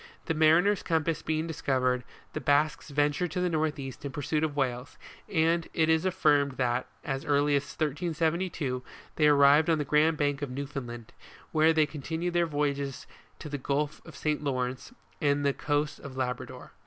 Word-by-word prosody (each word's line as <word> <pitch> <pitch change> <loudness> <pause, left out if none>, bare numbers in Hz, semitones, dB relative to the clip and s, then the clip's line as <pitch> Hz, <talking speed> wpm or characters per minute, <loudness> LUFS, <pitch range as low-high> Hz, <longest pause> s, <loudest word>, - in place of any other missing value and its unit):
The 160 - 0
mariner's 160 +6 +4
compass 160 -1 0
being 155 0 -1
discovered, 130 -5 0 0.3
the - - -4
Basques 150 +1 +1
ventured 145 +4 +1
to - - -1
the 180 -1 0
north 155 -1 0
east 135 -2 -7
in 140 - -4
pursuit 150 +2 -1
of 150 -2 -1
w 135 -3 +2
r 120 - -6
hales, 125 +3 -13 0.3
and 165 +1 +2
it 160 -1 +2
is 160 +2 +3
affirmed 150 -7 +2
that, 125 -1 -1 0.2
as 135 0 -3
early 145 0 +2
as 140 - +3
1372, 160 -3 -1 0.4
they 150 - +5
arrived 145 +2 +6
on 165 - +4
the 150 - -2
grand 150 +3 +3
bank 145 -1 0
of 145 - -3
New 140 +3 -4
foundland, 120 -5 -7 0.4
whence 160 +1 +4
they 155 -1 +5
continued 160 +4 -4
their 175 -1 +2
voyages 140 -2 -2 0.3
to - - -8
the 145 -1 -4
Gulf 145 +3 -2
of - - -13
St. 150 -1 -1
Lawrence, 130 - -2 0.3
and 145 -1 +2
the 140 - +3
coasts 145 +1 -1
of 130 -2 -9
Labrador. 125 -1 -4
150 Hz, 185 wpm, -29 LUFS, 140-160 Hz, 0.4 s, arrived